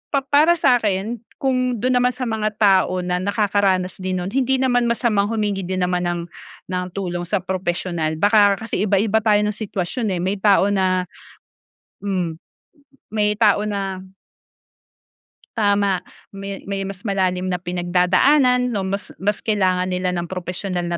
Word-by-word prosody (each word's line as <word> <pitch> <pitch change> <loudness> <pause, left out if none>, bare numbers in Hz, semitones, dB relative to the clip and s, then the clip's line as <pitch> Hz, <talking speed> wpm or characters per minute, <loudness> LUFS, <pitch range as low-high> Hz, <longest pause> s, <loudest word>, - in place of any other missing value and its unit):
pa 275 - +1
para 295 +5 +4
sa 250 -6 +3
akin 210 +3 -2 0.2
kung 255 -2 +1
dun 250 0 +2
naman 250 0 +1
sa 255 - -4
mga 215 -2 -2
tao 190 -3 +3
na 180 0 -1
nakakaranas 200 -2 0
din 185 0 -2
nun, 190 - -5
hindi 265 +1 +1
naman 245 -2 +2
masamang 225 -4 +1
humingi 210 -3 -1
din 185 0 -1
naman 180 0 0
ng 175 0 -2 0.5
ng 180 0 -1
tulong 175 -3 -3
sa 190 0 -1
professional. 175 -3 -2
Baka 205 +3 +4
kasi 220 -2 -4
iba-iba 205 +2 +2
tayo 210 -1 +3
ng 210 - 0
sitwasyon 215 +2 -3
eh, 175 - -3
may 195 +2 -1
tao 200 0 +4
na 185 -2 +1 1.0
mm, 180 -5 -3 0.8
may 210 -1 +1
tao 210 -2 +4
na 195 -3 -3 1.5
Tama. 200 -3 +2 0.3
May 195 0 -7
may 195 0 -3
mas 195 +1 -7
malalim 185 -2 0
na 180 -1 -2
pinagdadaanan 185 +9 +2
'no, 200 - -1
mas 200 +1 -4
mas 205 +2 +1
kailangan 185 -5 +1
nila 185 0 -1
ng 175 -1 -2
propesyonal 180 +1 -4
na 170 - -1
200 Hz, 155 wpm, -21 LUFS, 185-220 Hz, 1.5 s, para